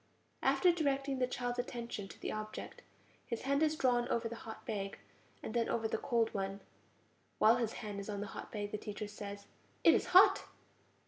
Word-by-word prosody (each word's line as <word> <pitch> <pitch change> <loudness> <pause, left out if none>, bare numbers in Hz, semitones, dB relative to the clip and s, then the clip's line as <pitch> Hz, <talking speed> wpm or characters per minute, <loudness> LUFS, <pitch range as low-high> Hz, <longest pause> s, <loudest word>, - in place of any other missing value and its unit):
After 360 - +5
directing 275 -4 0
the 250 - +2
child's 245 -1 -2
attention 235 -4 -4
to - - -13
the - - -3
object, 215 0 -6 0.5
his 235 -3 -3
hand 280 +2 +2
is 310 0 +3
drawn 245 -4 +2
over 235 -1 0
the 235 - -6
hot 220 - -8
bag, 200 -3 -3 0.5
and - - -5
then 235 -1 +1
over 225 -1 0
the - - -2
cold 230 -2 +1
one; 195 0 -3 0.8
while 225 +3 +6
his 230 -2 -1
hand 205 -1 -4
is 200 - -6
on 205 -1 -3
the 205 - -3
hot - - -7
bag 205 -1 -3
the 210 - -3
teacher 210 0 -5
says: 200 -1 -7 0.4
It - - +8
is - - +1
hot! 370 +2 +7
230 Hz, 195 wpm, -35 LUFS, 210-250 Hz, 0.8 s, It